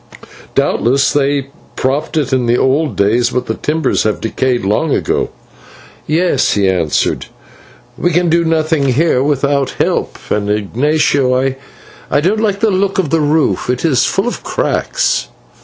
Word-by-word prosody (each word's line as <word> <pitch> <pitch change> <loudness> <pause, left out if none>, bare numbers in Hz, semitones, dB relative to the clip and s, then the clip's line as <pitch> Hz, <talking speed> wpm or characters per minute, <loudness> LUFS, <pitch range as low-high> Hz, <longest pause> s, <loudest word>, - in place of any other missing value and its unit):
Doubtless 135 +4 +2
they 140 -1 +1 0.3
propped 145 +5 -1
it 145 -3 0
in 125 -2 +1
the 120 +1 +3
old 135 -1 +1
days, 110 +5 +2
but 125 - -2
the 110 - -2
timbers 150 +3 -1
have 110 -1 -1
decayed 120 0 -1
long 135 +10 +1
ago." - - -1 0.8
"Yes," 160 -3 +1
he 100 -2 +1
answered, 85 -5 0 0.7
"we 175 - +2
can 175 +1 +1
do 170 +1 +2
nothing 160 -2 +1
here 145 -1 +2
without 140 -1 +1
help, - - -1
and, 105 -1 0
Ignatio, 130 +4 +1 0.6
I - - +2
don't 195 +8 +1
like 205 -3 0
the 220 -2 +3
look 195 +2 0
of 180 -7 0
the 165 -1 +2
roof, 150 -3 +1
it 125 +5 -1
is 140 -5 +3
full 195 +4 0
of 245 - -4
cracks." - - -1
140 Hz, 155 wpm, -15 LUFS, 125-160 Hz, 0.8 s, the